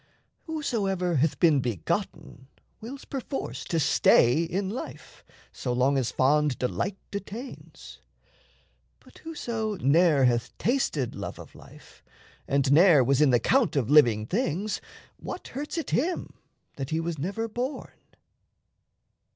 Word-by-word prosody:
Whosoever 195 Hz, -, -1 dB
Hath 150 Hz, +3 st, +1 dB
been 160 Hz, -5 st, +4 dB
begotten 120 Hz, +3 st, -4 dB, 0.3 s
wills 260 Hz, +5 st, -9 dB
perforce 270 Hz, 0 st, -5 dB
to 165 Hz, -, -1 dB
stay 130 Hz, -1 st, +4 dB
In 185 Hz, +4 st, -2 dB
life, 215 Hz, +6 st, -8 dB, 0.3 s
so 125 Hz, -, -4 dB
long 130 Hz, +3 st, +2 dB
as 130 Hz, -3 st, 0 dB
fond 145 Hz, 0 st, +2 dB
delight 185 Hz, +10 st, -2 dB
detains; 210 Hz, +6 st, -8 dB, 1.0 s
But -, -, -19 dB
whoso 230 Hz, -9 st, -4 dB
ne'er 160 Hz, -2 st, +3 dB
hath 120 Hz, -2 st, 0 dB
tasted 215 Hz, -, 0 dB
love -, -, -6 dB
of -, -, -12 dB
life, -, -, -17 dB, 0.4 s
And 140 Hz, -1 st, +1 dB
ne'er 160 Hz, -2 st, +6 dB
was 135 Hz, +3 st, +2 dB
in 150 Hz, -, +5 dB
the 120 Hz, -2 st, +4 dB
count 245 Hz, -, +2 dB
of 135 Hz, -2 st, 0 dB
living 120 Hz, -8 st, +5 dB
things, 200 Hz, -, -2 dB, 0.4 s
What -, -, -7 dB
hurts 290 Hz, +6 st, -5 dB
it 330 Hz, -, -3 dB
him 340 Hz, +7 st, -1 dB, 0.4 s
that 135 Hz, -1 st, -4 dB
he 160 Hz, -, -1 dB
was 165 Hz, -2 st, -3 dB
never 200 Hz, +9 st, -3 dB
born? 245 Hz, +5 st, -4 dB
165 Hz, 130 wpm, -27 LUFS, 135-225 Hz, 1.0 s, ne'er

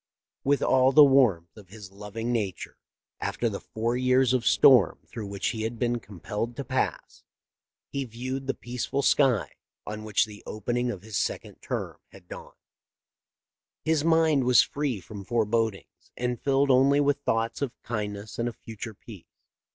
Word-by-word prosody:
With 140 Hz, +1 st, +2 dB
all 130 Hz, 0 st, +4 dB
the 150 Hz, +2 st, +8 dB
warmth 120 Hz, -, +3 dB
of 105 Hz, -3 st, -14 dB
his 100 Hz, 0 st, -12 dB
loving 105 Hz, +4 st, -5 dB
nature, 105 Hz, -6 st, -3 dB, 0.4 s
after 120 Hz, -, -1 dB
the 100 Hz, -, -5 dB
four 115 Hz, +2 st, -3 dB
years 130 Hz, 0 st, +3 dB
of 120 Hz, -3 st, 0 dB
storm 110 Hz, -3 st, +6 dB
through 110 Hz, -3 st, -7 dB
which 100 Hz, 0 st, -2 dB
he 110 Hz, -, -4 dB
had 115 Hz, +2 st, -3 dB
been 120 Hz, 0 st, 0 dB
com 100 Hz, -4 st, -13 dB
pelled 115 Hz, +5 st, -4 dB
to 140 Hz, -, -4 dB
pass, 130 Hz, +1 st, -3 dB, 0.6 s
he 140 Hz, -, -3 dB
viewed 130 Hz, +3 st, -5 dB
the 135 Hz, -, -1 dB
peaceful 125 Hz, +3 st, -3 dB
sky 135 Hz, -7 st, +2 dB, 0.3 s
on 105 Hz, 0 st, -6 dB
which 105 Hz, -1 st, +2 dB
the 105 Hz, -1 st, -12 dB
opening 120 Hz, +3 st, -2 dB
of 100 Hz, -5 st, -6 dB
his 110 Hz, -4 st, -4 dB
second -, -, -3 dB
term -, -, -4 dB
had 95 Hz, -2 st, -17 dB
dawned. -, -, -10 dB, 1.3 s
His 160 Hz, -2 st, +2 dB
mind 160 Hz, -4 st, +3 dB
was 125 Hz, -1 st, +6 dB
free 140 Hz, -7 st, -3 dB
from 100 Hz, +3 st, -9 dB
forebodings 115 Hz, -1 st, -2 dB
and 125 Hz, -1 st, -2 dB
filled 140 Hz, 0 st, +2 dB
only 135 Hz, +2 st, +4 dB
with 145 Hz, 0 st, +2 dB
thoughts 115 Hz, -2 st, -1 dB
of 140 Hz, -4 st, -4 dB
kindness 105 Hz, -1 st, -5 dB
and 120 Hz, +1 st, 0 dB
of 120 Hz, -, -11 dB
future 110 Hz, -1 st, -8 dB
peace." 100 Hz, -4 st, -13 dB
120 Hz, 165 wpm, -27 LUFS, 105-130 Hz, 1.3 s, the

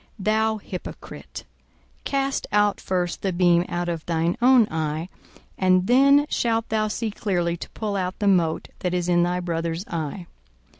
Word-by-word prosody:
Thou 220 Hz, +2 st, +1 dB
hypocrite, 190 Hz, -3 st, -8 dB, 0.6 s
cast 275 Hz, 0 st, -1 dB
out 205 Hz, -1 st, +2 dB
first 180 Hz, -2 st, -2 dB
the 195 Hz, -, 0 dB
beam 175 Hz, -1 st, +3 dB
out 175 Hz, 0 st, -2 dB
of 165 Hz, -2 st, -3 dB
thine 165 Hz, 0 st, 0 dB
own 250 Hz, -3 st, +6 dB
eye, 155 Hz, +2 st, -2 dB, 0.5 s
and 185 Hz, -1 st, +3 dB
then 275 Hz, +5 st, +5 dB
shalt 230 Hz, -5 st, 0 dB
thou 215 Hz, -1 st, +1 dB
see 220 Hz, +1 st, -3 dB
clearly 175 Hz, -5 st, -1 dB
to -, -, -8 dB
pull 210 Hz, -2 st, -3 dB
out 185 Hz, -1 st, -2 dB
the 205 Hz, -, -2 dB
mote 170 Hz, -5 st, +2 dB
that 180 Hz, 0 st, -1 dB
is 175 Hz, -1 st, -1 dB
in 175 Hz, -1 st, +3 dB
thy 175 Hz, +1 st, +1 dB
brother's 170 Hz, 0 st, -3 dB
eye. 165 Hz, +2 st, -4 dB
185 Hz, 160 wpm, -24 LUFS, 170-215 Hz, 0.6 s, own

